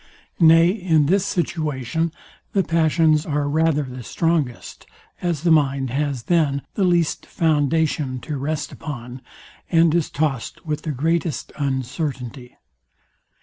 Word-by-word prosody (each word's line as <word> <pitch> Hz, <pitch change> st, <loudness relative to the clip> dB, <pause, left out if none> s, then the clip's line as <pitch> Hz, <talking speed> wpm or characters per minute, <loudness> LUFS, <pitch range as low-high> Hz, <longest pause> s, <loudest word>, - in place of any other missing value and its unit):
Nay, 165 Hz, 0 st, +7 dB
in 175 Hz, -7 st, +2 dB
this 195 Hz, +5 st, +2 dB
situation 160 Hz, -, -1 dB, 0.4 s
the 195 Hz, -, +3 dB
passions 160 Hz, -2 st, +3 dB
are 145 Hz, -2 st, -1 dB
rather 155 Hz, 0 st, +2 dB
the 130 Hz, -1 st, -8 dB
strongest, 150 Hz, -2 st, -2 dB, 0.3 s
as 170 Hz, -4 st, -1 dB
the 170 Hz, -, +3 dB
mind 135 Hz, -4 st, +2 dB
has 140 Hz, -2 st, -1 dB
then 145 Hz, -4 st, +1 dB
the 200 Hz, -, 0 dB
least 175 Hz, -3 st, +1 dB
foundation 150 Hz, -3 st, +1 dB
to 150 Hz, -, -5 dB
rest 150 Hz, +3 st, -3 dB
upon, 125 Hz, -4 st, -7 dB, 0.5 s
and 165 Hz, -2 st, +4 dB
is 170 Hz, -3 st, +1 dB
tossed 145 Hz, -3 st, -2 dB
with 155 Hz, -1 st, -2 dB
the 155 Hz, -, -3 dB
greatest 160 Hz, +3 st, -1 dB
uncertainty. 130 Hz, -2 st, -4 dB
155 Hz, 125 wpm, -22 LUFS, 140-165 Hz, 0.5 s, Nay